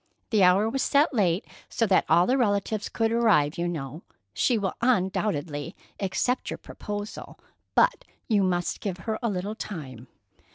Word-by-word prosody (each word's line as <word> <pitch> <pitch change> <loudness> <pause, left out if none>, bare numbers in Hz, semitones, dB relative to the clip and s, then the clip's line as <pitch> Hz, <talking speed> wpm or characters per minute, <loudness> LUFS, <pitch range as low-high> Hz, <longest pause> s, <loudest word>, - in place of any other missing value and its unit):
The 215 -3 +3
hour 185 +4 +5
was 265 +4 -1
set 285 +4 +3
late, 190 -4 +1 0.2
so 230 - +1
that 190 -3 +3
all 170 +3 +5
the 255 - +2
relatives 210 -3 0
could 225 -1 0
arrive, 190 -10 +3
you 175 - 0
know. 155 -2 -5 0.3
She 240 - +2
will 195 -3 -1
undoubtedly 185 - 0 0.2
accept 210 +6 -1
your - - -4
proposal, 205 0 -7 0.4
but - - +3 0.2
you 210 -4 +3
must 175 -2 0
give 190 -3 -3
her 220 -1 -2
a 235 - 0
little 200 +1 -3
time." 135 - -7
200 Hz, 160 wpm, -26 LUFS, 175-225 Hz, 0.4 s, hour